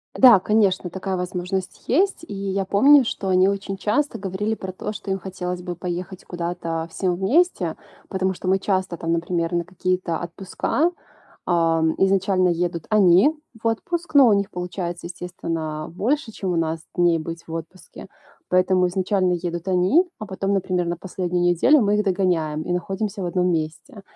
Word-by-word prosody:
Да, 245 -6 +8
конечно, 195 -3 +2
такая 190 +1 -3
возможность 180 +1 -4
есть, 360 +4 +1
и - - -7
я 195 0 -2
помню, 265 +7 +6
что 195 -3 -3
они 185 +1 +4
очень 195 0 -2
часто 215 +9 0
говорили 205 +3 -2
про 190 -2 -7
то, 210 - -5
что 210 -1 -8
им 190 0 0
хотелось 180 -1 -5
бы 175 -1 -4
поехать 180 +2 -5
куда-то 170 -2 -4
всем 180 +1 -1
вместе, 285 - +1 0.3
потому 190 -1 0
что 185 +1 -4
мы 190 0 +3
часто 185 -3 -1
там, 165 +1 -1
например, 170 0 -1
на 170 0 +1
какие-то 185 -1 -2
отпуска, 195 - -1 0.5
а, 165 -2 +2 0.2
изначально 190 -1 +3
едут 170 -1 -2
они 205 - +5 0.3
в - - -5
отпуск, 340 +10 -2
но 275 -4 +8
у 215 - +5
них 200 -1 +1
получается, 175 -1 -5
естественно, 165 -3 -5
больше, 245 - -1
чем 190 -3 -3
у 170 - -1
нас, 165 0 0 0.2
дней 175 -2 +3
быть 165 +1 -6
в - - -7
отпуске. 165 +3 -8 0.4
Поэтому 185 0 +3
изначально 185 0 +1
едут 175 0 -3
они, 190 - +3 0.2
а 215 - -5
потом, 195 +1 -2
например, 180 -2 0
на 170 0 -2
последнюю 180 -1 -2
неделю 175 - +4
мы 205 -1 +2
их 210 - +1
догоняем 175 -5 0
и - - -6
находимся 195 +2 -3
в - - -2
одном 180 +1 +1
месте. 160 +5 -4
185 Hz, 170 wpm, -22 LUFS, 175-200 Hz, 0.5 s, Да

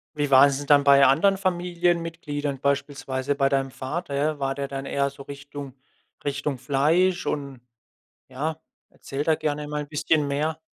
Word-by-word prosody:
Wie 145 -1 -1
war 135 +1 +8
es 140 -1 -1
denn 145 - -6
dann 145 -1 +6
bei 140 -1 +7
anderen 180 +9 +4
Familienmitgliedern, 170 -6 -1
beispielsweise 140 -1 -1
bei 135 -1 +2
deinem 135 -1 0
Vater, 140 +4 -5
ja? 150 +1 0
War 135 0 -1
der 140 -1 -3
dann 135 0 -5
eher 140 0 0
so 140 - -13
Richtung 140 -1 -9 0.5
Richtung 145 -1 -2
Fleisch 155 +8 +1
und 140 -4 -4 0.7
ja, 155 +5 -4 0.3
erzähl 140 +2 -5
da 160 - +3
gerne 150 -1 -3
mal 150 0 -3
ein 145 - -7
bisschen 150 0 +1
mehr. 155 +3 -1
145 Hz, 170 wpm, -25 LUFS, 140-155 Hz, 0.7 s, war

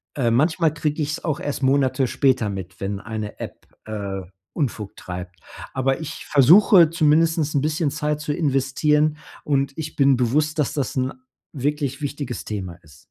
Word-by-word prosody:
Äh, 120 -5 +1
manchmal 155 +5 +2
kriege 155 -1 -2
ich 150 0 -1
es - - -6
auch 155 -4 -1
erst 145 -1 -3
Monate 130 -1 +2
später 125 -5 +2
mit, 95 -2 -7
wenn 100 0 -3
eine 110 0 -6
App, - - -8 0.2
äh, 100 -3 -4 0.3
Unfug 115 - -3
treibt. 90 0 -8 0.3
Aber 135 +2 0
ich 160 +1 -7
versuche 170 - +6
zumindestens 165 +1 +3
'n 150 -3 0
bisschen 155 0 0
Zeit 150 0 -2
zu 150 0 -2
investieren. 150 +1 +1 0.3
Und 140 -1 0
ich 155 -1 -5
bin 140 -2 +4
bewusst, 150 +6 +1
dass 145 -1 +1
das 140 -4 -2
'n 130 0 0 0.4
wirklich 140 0 -2
wichtiges 140 -5 -4
Thema 95 -5 -4
ist. 75 -4 -18
140 Hz, 165 wpm, -22 LUFS, 120-150 Hz, 0.4 s, versuche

